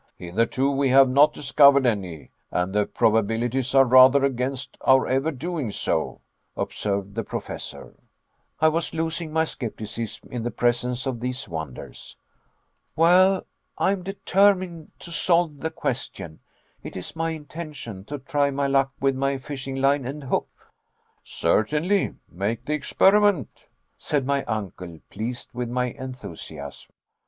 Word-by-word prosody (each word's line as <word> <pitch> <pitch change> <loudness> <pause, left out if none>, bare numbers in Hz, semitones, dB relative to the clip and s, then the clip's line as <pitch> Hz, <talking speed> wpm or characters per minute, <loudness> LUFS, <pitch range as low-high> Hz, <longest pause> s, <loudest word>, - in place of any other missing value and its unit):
"Hitherto 115 +9 0
we 140 -1 +1
have 135 +1 +7
not 140 +4 +5
discovered 140 -1 +5
any, 95 -9 -2 0.2
and 90 +2 -1
the 105 0 +2
probabilities 115 +3 +1
are 135 0 +7
rather 130 +2 +7
against 130 0 -3
our 130 0 +5
ever 135 +4 +1
doing 150 -4 -3
so," - - -2 0.4
observed 100 -1 -2
the - - -2
Professor. - - -7 0.7
I 160 - +5
was 165 +1 -2
losing 165 0 -2
my 160 +1 +2
skepticism 115 -4 -6
in 125 - -3
the 120 - -2
presence 120 +2 0
of 130 -3 -2
these 125 +2 -4
wonders. 80 -6 -8 0.8
"Well, 185 +4 +5 0.3
I - - +2
am 195 -2 -2
determined 185 -3 +1
to 170 - -10
solve 170 -3 +1
the 160 - -2
question. 125 - -5 0.4
It - - -8
is 95 - -7
my 165 0 -1
intention 150 - -7
to 145 +5 -5
try 145 +1 0
my 140 0 -1
luck 135 0 +2
with 135 0 +2
my 135 +1 0
fishing 135 0 -6
line 135 +1 +2
and 140 +4 -6
hook." 130 - -1 0.7
"Certainly; 155 - +1
make 110 +6 -3
the 150 - -1
experiment," 195 - +2 0.3
said 140 -3 -1
my 140 0 0
uncle, 95 -6 -5
pleased 120 +5 -5
with 125 -1 -3
my 125 0 -1
enthusiasm. 95 - -9
135 Hz, 140 wpm, -24 LUFS, 115-155 Hz, 0.8 s, have